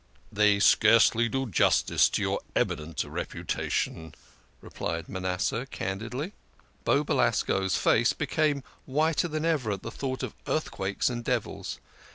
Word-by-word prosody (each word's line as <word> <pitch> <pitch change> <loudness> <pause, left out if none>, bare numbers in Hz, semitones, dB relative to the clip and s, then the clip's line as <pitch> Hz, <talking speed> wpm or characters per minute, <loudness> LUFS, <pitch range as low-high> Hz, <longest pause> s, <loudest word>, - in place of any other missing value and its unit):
"They 105 -1 +3
scarcely 115 +2 +5
do 135 +3 -1
justice 105 -9 +3
to - - -1
your - - 0 0.2
eminent 75 0 -1
reputation," 80 -2 -3 0.4
replied 85 0 -5
Manasseh 95 +6 -2
candidly. 125 - -4 0.5
Beau - - +3
Belasco's 95 -2 +1
face - - +3
became 145 -3 0 0.2
whiter 155 +5 +1
than 155 0 -3
even 145 -10 +1
at 95 - -7
the 115 - -5
thought 130 +1 -4
of - - -4
earthquakes 100 -10 -1
and 120 -2 -2
devils. - - -2
115 Hz, 125 wpm, -28 LUFS, 95-135 Hz, 0.5 s, scarcely